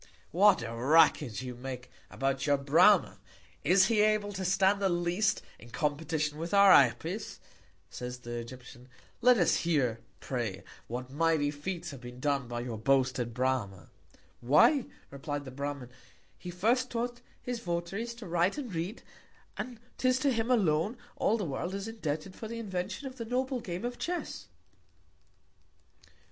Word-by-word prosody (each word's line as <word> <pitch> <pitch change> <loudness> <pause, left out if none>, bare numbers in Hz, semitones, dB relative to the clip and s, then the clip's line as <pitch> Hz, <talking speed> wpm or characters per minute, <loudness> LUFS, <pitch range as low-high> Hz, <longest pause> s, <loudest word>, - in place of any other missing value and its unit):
What 190 -6 +5
a 115 0 -5
Racket 130 -1 +3
you 125 -1 -5
make 125 0 -7 0.2
about 135 +1 -1
your 145 -1 +4
Brama! 165 - +4 0.4
Is 190 +2 +5
he 215 0 +3
able 210 -1 +2
to 190 -1 -4
stand 195 +2 +3
the 195 - +2
least 175 +4 0 0.2
in 120 - -14
Competition 150 +1 -2
with 170 +5 -2
our 200 -1 +8
Apis, 165 - +3 0.5
said 125 0 -6
the 120 -1 -6
Egyptian? 120 +1 -10 0.3
Let 250 0 +6
us 175 - +3
hear, 135 -9 +1 0.2
pray, 115 -7 -4 0.2
what 125 +2 -5
mighty 155 -1 +2
Feats 170 +3 -5
have 135 -3 -10
been 125 0 -10
done 140 -2 0
by 120 0 -4
your 120 -3 -5
boasted 130 0 +1
Brama? 120 -9 -1 0.5
Why, 150 - +4 0.2
replied 145 +1 -5
the 130 - -8
Bramin, 140 -2 -5 0.4
he 180 - -9
first 230 +9 +1
taught 240 +1 -3 0.2
his 245 -1 -4
Votaries 195 +5 -3
to 235 -2 -10
write 175 - +1
and 255 -9 -5
read; 170 +7 -4 0.5
and 245 -3 -6 0.2
'tis 255 0 +3
to 275 -1 +2
him 225 +1 -1
alone, 205 -2 +2 0.2
all 225 - +1
the 205 - -3
World 165 +6 -3
is 200 +2 -4
indebted 185 -5 -4
for 220 - -7
the 230 +1 -6
Invention 195 +3 -4
of 260 -1 -7
the 230 - -5
noble 255 +2 -1
Game 180 0 -5
of 245 0 -4
Chess. 355 0 -4
165 Hz, 155 wpm, -30 LUFS, 130-210 Hz, 0.5 s, our